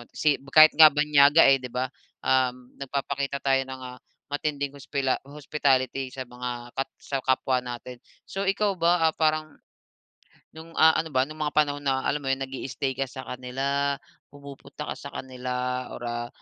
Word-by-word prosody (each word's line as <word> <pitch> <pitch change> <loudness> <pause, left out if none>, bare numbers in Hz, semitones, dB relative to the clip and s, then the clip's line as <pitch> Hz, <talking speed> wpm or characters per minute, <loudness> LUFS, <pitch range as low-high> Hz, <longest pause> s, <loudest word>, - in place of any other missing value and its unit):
si 150 -2 +1
kahit 155 0 +9
nga 155 -1 +10
banyaga 150 +1 +5
eh, 135 - +7
'di 125 - -6
ba, 130 +1 -1 0.4
um, 125 -1 +1
nagpapakita 140 0 -3
tayo 135 -1 +3
ng, 130 0 -8
ah, 125 0 -9 0.3
matinding 145 -1 -3
hospila 140 -1 -1
hospitality 135 -2 -1
sa 130 -1 -7
mga 120 0 -7
kap 135 - -2
sa 135 -2 -4
kapwa 130 -1 +1
natin. 125 0 -8 0.3
So, 195 - -3
ikaw 200 +1 +1
ba, 170 0 +3
ah, 160 - -3
parang, 155 0 0 1.0
no'ng 165 +1 -12
ah, 160 0 +7
ano 160 - -2
ba, 130 0 +4
nung 155 +3 -9
mga 150 -1 -2
panahon 145 -1 +2
na, 130 -1 +1
alam 150 - 0
mo 140 - -8
yun, 135 0 0
nag-i-stay 135 0 -4
ka 135 0 -1
sa 130 +1 -8
kanila, 135 +3 -2 0.3
pumupunta 140 -1 -9
ka - - -4
sa - - -8
kanila, 125 0 -3
or, - - -9
ah, 120 0 -3
135 Hz, 170 wpm, -26 LUFS, 130-150 Hz, 1.0 s, nga